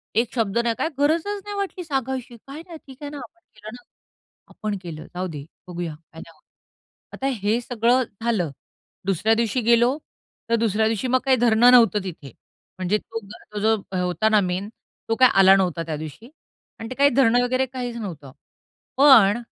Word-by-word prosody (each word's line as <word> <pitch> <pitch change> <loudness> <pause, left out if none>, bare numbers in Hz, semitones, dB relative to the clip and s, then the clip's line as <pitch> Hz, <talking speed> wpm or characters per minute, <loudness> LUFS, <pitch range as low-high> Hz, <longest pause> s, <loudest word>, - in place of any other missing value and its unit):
एक 230 +1 +1
शब्द 225 -2 0
नाही. 235 -1 0
काय 320 - -1
गरजच 335 +8 0
नाही 410 0 -6
वाटली 385 -2 -4
सांगायची. 265 -5 -4
काय 280 +3 -8
नाही 335 - -9
ठीक 265 - -12
आहे 290 - -5
ना, 295 - -7
आपण 345 +8 -36 0.2
केलं 215 0 -11
ना, 245 0 -12 0.7
आपण 210 -2 -4
केलं. 160 -3 -8
जाऊदे, 170 -6 -5 0.2
बघूया, 175 -2 -5
काही 160 +1 -15
नाही 165 -1 -18
होत. - - -31 0.7
आता 270 - -3
हे 210 +4 +1
सगळं 245 +1 +1 0.2
झालं. 210 -10 0 0.5
दुसऱ्या 195 +4 +2
दिवशी 235 +2 0
गेलो 235 +4 +3 0.5
तर 230 - +3
दुसऱ्या 220 -1 +1
दिवशी 225 +3 -1
मग 255 +1 +2
काही 265 -1 +4
धरणं 240 +1 +5
नव्हतं 230 -5 +5
तिथे. 155 -7 -8 0.5
म्हणजे 185 +3 +1
तो 225 +1 -7
जो 200 - -11 0.2
तो 210 - -3
जो 220 +1 +3 0.3
होता 180 +5 +1
ना 215 -1 +4
मेन 185 +2 -2 0.4
तो 225 - +2
काय 255 -1 +7
आला 195 0 +7
नव्हता 180 -4 0
त्या 160 -1 -4
दिवशी 155 - -9 0.5
आणि 225 - -7
ते 255 - -6
काही 280 +1 +4
धरणं 245 -2 +3
वगैरे 255 +1 +1
काहीच 250 -2 -6
नव्हतं. 160 - -7 0.7
पण 240 -6 +6
225 Hz, 185 wpm, -23 LUFS, 195-255 Hz, 0.7 s, काय